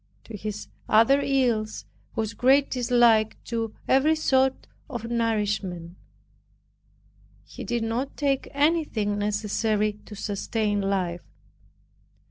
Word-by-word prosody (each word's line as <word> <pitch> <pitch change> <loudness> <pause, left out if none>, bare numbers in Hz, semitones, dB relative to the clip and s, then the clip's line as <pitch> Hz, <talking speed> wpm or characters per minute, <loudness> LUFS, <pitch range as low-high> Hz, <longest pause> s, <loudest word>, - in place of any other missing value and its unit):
To 230 - -9
his 210 +1 -6 0.2
other 230 +6 +5
ills 240 -6 0 0.3
was 220 0 -2
great 270 +5 +3
dislike 235 -3 +3
to 225 -2 -3
every 290 +4 +4
sort 265 -4 +1 0.2
of 240 -5 -5
nourishment; 205 -7 -1 1.5
he - - -10
did 240 -1 -2
not 235 +5 -3
take 275 -2 0
anything 285 -9 +1
necessary 210 +1 0
to 210 - -9
sustain 205 +1 -1
life. 185 -3 -1
225 Hz, 100 wpm, -25 LUFS, 210-260 Hz, 1.5 s, other